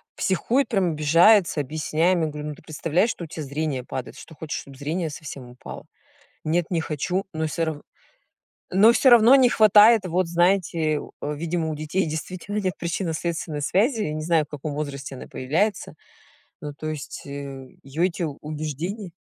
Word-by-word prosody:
психует, 240 Hz, +8 st, +1 dB
прям 195 Hz, -6 st, +1 dB
обижается, 165 Hz, +4 st, +4 dB
объясняем. 155 Hz, +5 st, 0 dB
Я -, -, +1 dB
говорю: 150 Hz, 0 st, -6 dB
"Ну 150 Hz, -, -6 dB
ты -, -, -18 dB
представляешь, 165 Hz, +7 st, 0 dB
что -, -, -7 dB
у -, -, -6 dB
тя 160 Hz, -, -7 dB
зрение 145 Hz, -2 st, -3 dB
падает, 130 Hz, -, -6 dB
что 160 Hz, -, -12 dB
хочешь, 155 Hz, 0 st, -5 dB
чтобы 135 Hz, -1 st, -14 dB
зрение 160 Hz, +4 st, -2 dB
совсем 140 Hz, -4 st, -9 dB
упало?" 125 Hz, -, -10 dB, 0.6 s
"Нет, 165 Hz, +2 st, 0 dB
не 170 Hz, -3 st, +1 dB
хочу". 165 Hz, +5 st, -2 dB
Но 160 Hz, 0 st, -2 dB
всё 160 Hz, +2 st, -1 dB
ра 155 Hz, -2 st, -4 dB, 0.9 s
но 210 Hz, +5 st, +7 dB
всё 260 Hz, +2 st, +4 dB
равно 240 Hz, +1 st, +8 dB
не 260 Hz, -2 st, +6 dB
хватает, 215 Hz, 0 st, +6 dB
вот 180 Hz, 0 st, 0 dB
знаете, 170 Hz, -3 st, +1 dB, 0.2 s
видимо, 160 Hz, +2 st, -2 dB
у -, -, -2 dB
детей 155 Hz, +5 st, -1 dB
действительно 180 Hz, +6 st, -4 dB
нет 185 Hz, -3 st, -1 dB
причинно-следственной 165 Hz, -3 st, -3 dB
связи. 220 Hz, -, +1 dB
Не 155 Hz, -2 st, -3 dB
знаю, 160 Hz, -1 st, +2 dB
в -, -, -24 dB
каком 150 Hz, 0 st, -5 dB
возрасте 140 Hz, -2 st, -5 dB
она -, -, -9 dB
появляется. 170 Hz, +10 st, -1 dB, 0.7 s
Ну, 150 Hz, -1 st, -5 dB
то 150 Hz, +2 st, -8 dB
есть, 155 Hz, -2 st, -6 dB
э, -, -, -10 dB, 0.5 s
её 145 Hz, +6 st, -2 dB
эти 180 Hz, -1 st, -1 dB
убеждения 155 Hz, +6 st, -5 dB
160 Hz, 170 wpm, -24 LUFS, 150-185 Hz, 0.9 s, равно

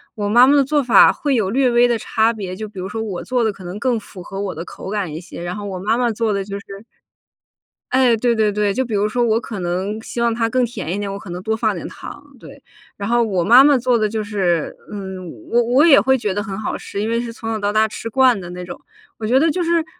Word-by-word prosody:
我 205 Hz, -1 st, -2 dB
妈 240 Hz, +4 st, +6 dB
妈 280 Hz, +2 st, +4 dB
的 280 Hz, -, +5 dB
做 295 Hz, +1 st, +1 dB
法 245 Hz, -, +6 dB
会 290 Hz, -2 st, -1 dB
有 220 Hz, -7 st, +1 dB
略 260 Hz, +4 st, +2 dB
微 240 Hz, +1 st, +5 dB
的 240 Hz, -1 st, +1 dB
差 220 Hz, +1 st, +1 dB
别， 195 Hz, -5 st, -6 dB
就 215 Hz, +3 st, -6 dB
比 205 Hz, -1 st, -16 dB
如 185 Hz, +1 st, -5 dB
说 225 Hz, +1 st, -4 dB
我 205 Hz, -5 st, -5 dB
做 250 Hz, 0 st, -1 dB
得 220 Hz, -2 st, +1 dB
可 195 Hz, -, -13 dB
能 180 Hz, +3 st, -7 dB
更 245 Hz, 0 st, +1 dB
符 200 Hz, -3 st, -10 dB
合 195 Hz, +2 st, -7 dB
我 200 Hz, -2 st, -3 dB
的 165 Hz, -, -7 dB
口 -, -, -9 dB
感 200 Hz, -6 st, -2 dB
一 160 Hz, -, -6 dB
些， 170 Hz, -, -10 dB
然 175 Hz, +1 st, -4 dB
后 205 Hz, -, -6 dB
我 190 Hz, -2 st, -5 dB
妈 215 Hz, +5 st, 0 dB
妈 245 Hz, -1 st, +1 dB
做 220 Hz, 0 st, -1 dB
的 200 Hz, -1 st, -1 dB
就 200 Hz, 0 st, -6 dB
是 -, -, -16 dB, 1.3 s
诶， 255 Hz, -3 st, +4 dB
对 235 Hz, +1 st, +1 dB
对 215 Hz, -1 st, +2 dB
对， 205 Hz, -1 st, 0 dB
就 260 Hz, -, 0 dB
比 235 Hz, -3 st, -6 dB
如 205 Hz, 0 st, +1 dB
说 240 Hz, +3 st, 0 dB
我 225 Hz, -1 st, +2 dB
可 215 Hz, -3 st, -7 dB
能 185 Hz, +5 st, -3 dB
希 240 Hz, -, -6 dB
望 235 Hz, -1 st, +2 dB
它 225 Hz, -1 st, 0 dB
更 255 Hz, +1 st, +1 dB
甜 200 Hz, -8 st, -5 dB
一 200 Hz, -, -3 dB
点， 200 Hz, -1 st, -3 dB
我 195 Hz, -, -5 dB
可 195 Hz, -, -11 dB
能 175 Hz, +1 st, -6 dB
多 220 Hz, +3 st, -1 dB
放 220 Hz, -, 0 dB
点 -, -, -6 dB
糖， -, -, -11 dB
对。 -, -, -14 dB, 0.4 s
然 200 Hz, -, -4 dB
后 240 Hz, 0 st, +3 dB
我 190 Hz, -6 st, -1 dB
妈 245 Hz, +5 st, +8 dB
妈 285 Hz, -1 st, +5 dB
做 250 Hz, 0 st, +2 dB
得 215 Hz, -1 st, 0 dB
就 220 Hz, +1 st, -2 dB
是 190 Hz, -6 st, -1 dB, 0.2 s
嗯， 190 Hz, -4 st, -7 dB, 0.2 s
我 240 Hz, +1 st, +3 dB
我 250 Hz, +6 st, +4 dB
也 300 Hz, -5 st, +7 dB
会 265 Hz, 0 st, +3 dB
觉 210 Hz, -5 st, -2 dB
得 205 Hz, +2 st, -2 dB
很 195 Hz, -3 st, -6 dB
好 215 Hz, -, -3 dB
吃， 200 Hz, -, -6 dB
因 215 Hz, -, -2 dB
为 230 Hz, +1 st, 0 dB
是 240 Hz, -1 st, -5 dB
从 225 Hz, -1 st, -7 dB
小 225 Hz, -, -1 dB
到 205 Hz, -1 st, -1 dB
大 215 Hz, +1 st, +3 dB
吃 230 Hz, +1 st, -7 dB
惯 255 Hz, -2 st, +3 dB
的 175 Hz, -2 st, -8 dB
那 180 Hz, 0 st, -7 dB
种。 -, -, -8 dB, 0.4 s
我 220 Hz, -, -5 dB
觉 250 Hz, +4 st, +3 dB
得 325 Hz, +3 st, +3 dB
就 350 Hz, +3 st, -1 dB
是 335 Hz, -1 st, +1 dB
220 Hz, 305 characters per minute, -19 LUFS, 200-240 Hz, 1.3 s, 妈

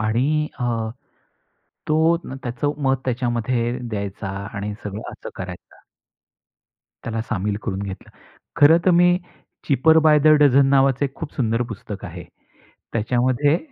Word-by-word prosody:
आणि 135 Hz, +8 st, +1 dB
अ, 125 Hz, -, -2 dB, 1.2 s
तो 160 Hz, +2 st, +3 dB
त्याचं 135 Hz, +2 st, -3 dB
मत 135 Hz, 0 st, +3 dB
त्याच्यामध्ये 120 Hz, -1 st, -1 dB
द्यायचा 100 Hz, -2 st, -4 dB, 0.3 s
आणि 105 Hz, 0 st, -4 dB
सगळं 105 Hz, +1 st, -6 dB
असं -, -, -9 dB
करायचा. 90 Hz, -1 st, -9 dB, 1.2 s
त्याला 115 Hz, -1 st, -3 dB
सामील 105 Hz, -2 st, -2 dB
करून 100 Hz, -2 st, -3 dB
घेतलं. 95 Hz, -1 st, -7 dB, 0.5 s
खरंतर 165 Hz, +5 st, +6 dB
मी 175 Hz, +1 st, +4 dB, 0.5 s
"चिपर 160 Hz, +4 st, +5 dB
बाय 150 Hz, -1 st, +6 dB
द 155 Hz, -, +1 dB, 0.2 s
डजन" 140 Hz, -1 st, +5 dB
नावाचं 135 Hz, 0 st, +3 dB
एक 135 Hz, 0 st, -4 dB
खूप 160 Hz, -3 st, -7 dB
सुंदर 115 Hz, -2 st, 0 dB
पुस्तक 105 Hz, -1 st, -8 dB
आहे. -, -, -8 dB, 0.7 s
त्याच्यामध्ये 130 Hz, +7 st, +1 dB
125 Hz, 125 wpm, -22 LUFS, 110-145 Hz, 1.2 s, खरंतर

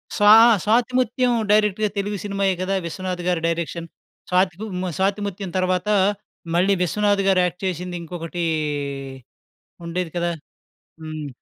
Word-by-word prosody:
స్వాహ 215 Hz, +2 st, +8 dB, 0.2 s
'స్వాతిముత్యం' 245 Hz, +2 st, +2 dB, 0.2 s
డైరెక్ట్‌గా 210 Hz, 0 st, +3 dB
తెలుగు 205 Hz, +1 st, -2 dB
సినిమాయే 195 Hz, -2 st, 0 dB
కదా 190 Hz, +1 st, 0 dB
'విశ్వనాథ్' 180 Hz, +1 st, -4 dB
గారి 175 Hz, -2 st, +1 dB
డైరెక్షన్. 170 Hz, 0 st, -3 dB, 0.4 s
స్వాతి 185 Hz, -1 st, +2 dB, 0.3 s
మ్ -, -, -2 dB
'స్వాతిముత్యం' 195 Hz, -1 st, -2 dB
తరువాత 185 Hz, +1 st, 0 dB, 0.7 s
మళ్ళీ 185 Hz, +3 st, +3 dB
'విశ్వనాథ్' 205 Hz, +2 st, +1 dB
గారు 190 Hz, -1 st, +4 dB
యాక్ట్ 180 Hz, +2 st, -5 dB
చేసింది 180 Hz, -1 st, -3 dB
ఇంకొకటీ 170 Hz, 0 st, -4 dB, 1.4 s
ఉండేది 170 Hz, 0 st, -3 dB
కదా? 175 Hz, 0 st, 0 dB, 0.7 s
హ్మ్. 155 Hz, -2 st, -6 dB
185 Hz, 115 wpm, -22 LUFS, 175-205 Hz, 1.4 s, స్వాహ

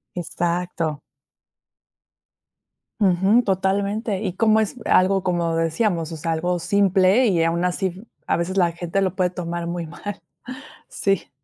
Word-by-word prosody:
Exacto. 170 Hz, -3 st, -2 dB, 2.0 s
Ujú, 195 Hz, +5 st, +4 dB
totalmente. 200 Hz, +1 st, -1 dB
Y 190 Hz, -4 st, -2 dB
cómo 220 Hz, +2 st, +3 dB
es 220 Hz, +1 st, -1 dB
algo, 190 Hz, +1 st, +3 dB
como 175 Hz, -2 st, 0 dB
decíamos, 165 Hz, 0 st, 0 dB
o 165 Hz, -, -5 dB
sea, 165 Hz, +2 st, -2 dB
algo 175 Hz, +2 st, 0 dB
simple 195 Hz, +5 st, +3 dB
y 175 Hz, -5 st, +2 dB
aun 165 Hz, +1 st, 0 dB
así, 185 Hz, +3 st, -2 dB, 0.2 s
a -, -, +1 dB
veces 175 Hz, +3 st, -2 dB
la 175 Hz, -3 st, +3 dB
gente 175 Hz, +3 st, -2 dB
lo 190 Hz, -1 st, 0 dB
puede 185 Hz, -1 st, +1 dB
tomar 170 Hz, -1 st, -4 dB
muy 170 Hz, 0 st, -3 dB
mal, 200 Hz, +5 st, -7 dB, 0.7 s
sí. 195 Hz, -2 st, -1 dB
180 Hz, 135 wpm, -22 LUFS, 170-195 Hz, 2.0 s, Ujú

